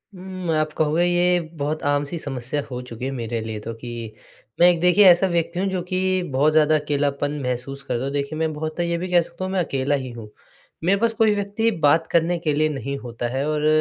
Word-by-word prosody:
हुँ, 185 -2 -4
आप 155 0 0
कहोगे 160 +2 +1
ये 175 0 +3 0.2
बहुत 150 +2 -2
आम-सी 145 +2 0
समस्या 135 0 -3
हो 125 -1 -5
चुकी 125 0 -7
है 135 - -2
मेरे 115 -3 -3
लिए 110 -1 -5
तो 115 +2 -6
कि 115 -1 -7 0.5
मैं 175 - +8
एक 175 -2 +2
देखिए 180 +3 +5
ऐसा 180 +1 +6
व्यक्ति 170 0 -1
हूँ 195 - 0
जो 185 -1 -2
कि 185 0 +1
बहुत 145 +4 +3
ज़्यादा 155 0 +4
अकेलापन 145 -1 -1
महसूस 125 +2 -3
करता 130 -2 -2
हूँ 140 - -2
देखिए 145 +2 -2
मैं 160 -1 0
बहुत 155 +2 -5
तो 175 - +1
ये 170 0 -1
भी 180 +2 -4
कह 175 - +5
सकता 170 +2 -8
हूँ 185 - -4
मैं 190 - +1
अकेला 140 -1 0
ही 130 -3 -4
हूँ। 115 -3 -9 0.5
मेरे 195 +3 +3
पास 230 +1 +2
कोई 220 -2 +3
व्यक्ति 205 +3 0
बात 160 +3 +4
करने 170 +1 +2
के 155 -3 0
लिए 155 +1 +2
नहीं 140 -1 -4
होता 120 -2 -5
है 135 +3 -2
और 150 0 0
155 Hz, 230 wpm, -22 LUFS, 135-175 Hz, 0.5 s, मैं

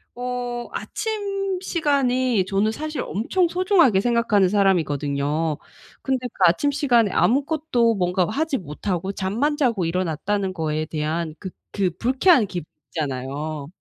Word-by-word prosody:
어 245 -1 -4
아침 395 -3 -3
시간이 260 - +1
저는 195 +3 +1
사실 305 +5 -4
엄청 345 - 0
소중하게 350 - +3
생각하는 230 -4 +2
사람이거든요. 155 -5 +1 0.5
근데 260 -2 -1
그 240 - -20
아침 175 +12 +3
시간에 250 -7 +3
아무것도 270 -3 +2
뭔가 180 -1 +1
하지 290 +4 0
못하고 180 +3 -3
잠만 225 +11 -1
자고 230 - +1
일어났다는 185 +3 -1
거에 155 -2 -2
대한 155 +1 -3
그 190 - -6 0.2
그 190 -3 0
불쾌한 260 - +4
기분 175 -5 -5 0.2
있잖아요. 145 +1 -4
210 Hz, 300 characters per minute, -23 LUFS, 170-270 Hz, 0.5 s, 불쾌한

